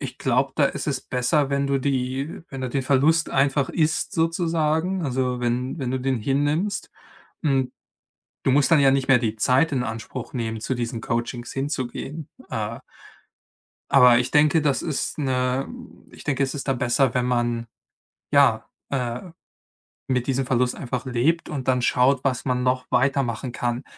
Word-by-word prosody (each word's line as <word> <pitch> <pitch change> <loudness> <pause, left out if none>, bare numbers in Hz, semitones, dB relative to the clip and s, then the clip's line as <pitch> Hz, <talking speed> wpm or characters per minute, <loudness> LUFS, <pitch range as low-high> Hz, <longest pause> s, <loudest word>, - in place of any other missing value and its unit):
Ich 130 -2 -6
glaube, 130 +1 +1
da 150 - +4
ist 140 - -2
es 140 -3 -1
besser, 130 +3 0
wenn 140 0 +1
du 140 0 +2
die 135 +2 -2
wenn 135 - -6
du 130 - -2
den 135 +2 -1
Verlust 145 +5 +3
einfach 135 0 +2
isst 155 0 0
sozusagen, 165 +1 0
also, 125 -2 -1
wenn 125 +5 -1
wenn 130 -3 -2
du 130 - 0
den 130 -1 0
hinnimmst. 145 - 0 0.5
Hm. 135 -4 +1 0.7
Du - - +3
musst 145 +4 +3
dann 165 - +6
ja 135 -1 +5
nicht 135 0 0
mehr 135 - +7
die 110 -2 -1
Zeit 130 +8 +2
in 125 -2 0
Anspruch 115 +2 -6
nehmen, 115 -3 -3
zu 130 - -1
diesen 120 -1 -3
Coachings 120 +1 -3
hinzugehen, 140 +2 -4 0.2
äh - - -3 1.1
aber 125 -1 +7
ich 125 +1 -2
denke, 150 +1 +4
das 145 -3 +1
ist 155 -5 -3
'ne 130 -2 0 0.4
ich - - -13
denke, 140 -1 0
es 135 - -2
ist 145 - -6
da 135 - +2
besser, 125 +1 +1
wenn 125 -2 +1
man, 120 -1 0 0.7
ja, - - +4 0.2
äh, 125 -3 -2 0.9
mit 125 -2 0
diesem 135 0 0
Verlust 125 0 +1
einfach 125 0 -4
lebt 130 +7 0
und 135 -4 -5
dann 125 -1 +2
schaut, 125 +2 +3
was 130 -3 -1
man 125 -1 0
noch 125 0 +1
weitermachen 125 -1 +1
kann. 120 +1 -2
130 Hz, 170 wpm, -24 LUFS, 125-140 Hz, 1.1 s, mehr